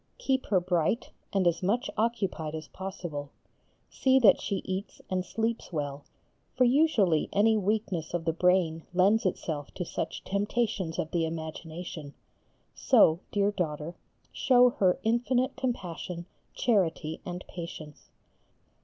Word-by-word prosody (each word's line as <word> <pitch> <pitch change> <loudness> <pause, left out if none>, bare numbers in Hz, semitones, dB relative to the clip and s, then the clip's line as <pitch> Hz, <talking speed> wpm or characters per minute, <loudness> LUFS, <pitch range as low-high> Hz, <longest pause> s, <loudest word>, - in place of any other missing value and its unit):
Keep 265 - 0
her 190 - +3
bright, 175 +5 0 0.2
and 195 -3 +1
as 170 -1 +2
much 230 +9 +1
occupied 195 -9 -1
as 155 -1 -6
possible, 175 -7 -6 0.6
see 265 0 +3
that 245 -5 +6
she 200 - -2
eats 190 +1 -4
and 185 -1 0
sleeps 225 +4 -2
well, 145 -3 -4 0.5
for 255 - +5
usually 240 - +3
any 220 +2 +4
weakness 200 -5 -1
of 165 -2 -3
the 165 - +1
brain 175 -2 +2
lends 200 +3 +4
itself 155 -5 -3
to 180 - -3
such 160 - -4
temptations 205 -3 -1
of 160 - -2
the 170 -1 +1
imagination, 160 -1 -6 0.6
so, 160 +1 +5
dear 205 0 +2
daughter, 160 -3 -3 0.4
show 250 -2 +5
her 185 -5 +2
infinite 245 +3 +1
compassion, 180 -8 -4 0.3
charity, 170 -8 0
and 180 0 -6
patience. 165 -4 -9
185 Hz, 130 wpm, -29 LUFS, 160-220 Hz, 0.6 s, that